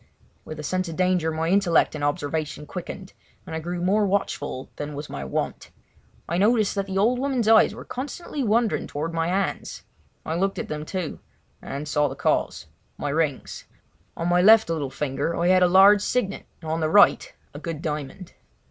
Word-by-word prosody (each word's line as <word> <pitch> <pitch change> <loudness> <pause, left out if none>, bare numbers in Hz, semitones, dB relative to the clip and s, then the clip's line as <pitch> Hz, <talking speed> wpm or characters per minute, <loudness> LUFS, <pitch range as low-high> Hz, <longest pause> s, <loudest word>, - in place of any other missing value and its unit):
With 155 0 -8
a - - -5
sense 185 +3 -2
of 165 - -6
danger 180 -2 +1
my 160 +1 -1
intellect 185 -3 +3
and 150 -2 -5
observation 150 +1 -2
quickened, 185 +3 -8 0.3
and - - -6
I - - -2
grew 175 +2 -4
more 205 +3 +2
watchful 145 -9 -2
than 145 0 -5
was 145 +1 -7
my 70 - -5
wont. 65 - -4 0.6
I 170 - -1
noticed 215 0 +3
that 200 -1 -2
the 190 0 -3
old 235 +5 +2
woman's 260 -4 0
eyes 220 0 +5
were - - -10
constantly 285 +2 -5
wandering 225 0 +1
towards 160 +3 -4
my 165 0 0
hands. 190 +2 -2 0.4
I 160 - -2
looked 195 +3 0
at - - -5
them 150 0 -4
too, 180 -2 -4 0.4
and 145 +2 -6
saw 150 0 +2
the 135 - -6
cause—my 145 - -3
rings. 150 -2 -2 0.5
On 165 - -2
my 175 0 +3
left 215 -2 +6
little 150 -4 -2
finger 150 +4 -2
I 175 +1 +2
had 185 0 +5
a 180 - +6
large 195 +3 +7
signet 210 -3 -2 0.2
and 155 - -4
on 160 - -1
the 155 -1 0
right 205 +3 +5 0.2
a 145 - -8
good 160 -1 -6
diamond. 150 +3 -5
175 Hz, 190 wpm, -24 LUFS, 150-200 Hz, 0.6 s, large